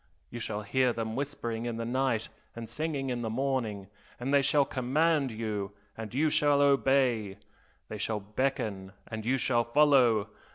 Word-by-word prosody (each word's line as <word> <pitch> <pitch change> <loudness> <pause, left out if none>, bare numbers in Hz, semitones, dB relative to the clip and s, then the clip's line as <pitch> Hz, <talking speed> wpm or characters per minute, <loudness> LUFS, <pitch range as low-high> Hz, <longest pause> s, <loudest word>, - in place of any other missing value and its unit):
you 120 - -6
shall 105 -2 -4
hear 125 +4 +2
them 115 -1 -3
whispering 120 -5 -3
in 115 -1 -3
the 115 - -3
night 125 -2 0 0.3
and 115 -1 -6
singing 140 +1 -3
in 120 -1 -2
the 115 - -2
morning, 115 -5 -2 0.3
and 130 +3 -2
they 140 - +6
shall 140 +1 +3
command 140 +3 +1
you 105 -3 -4 0.2
and 110 +1 -7
you 155 +4 +3
shall 145 -1 +3
obey! 135 -7 +2 0.5
they 105 - -7
shall 105 +1 -1
beckon 105 -3 -2 0.2
and 110 0 -5
you 135 +2 +3
shall 120 -1 +1
follow! 120 -4 +4
120 Hz, 165 wpm, -29 LUFS, 110-135 Hz, 0.5 s, they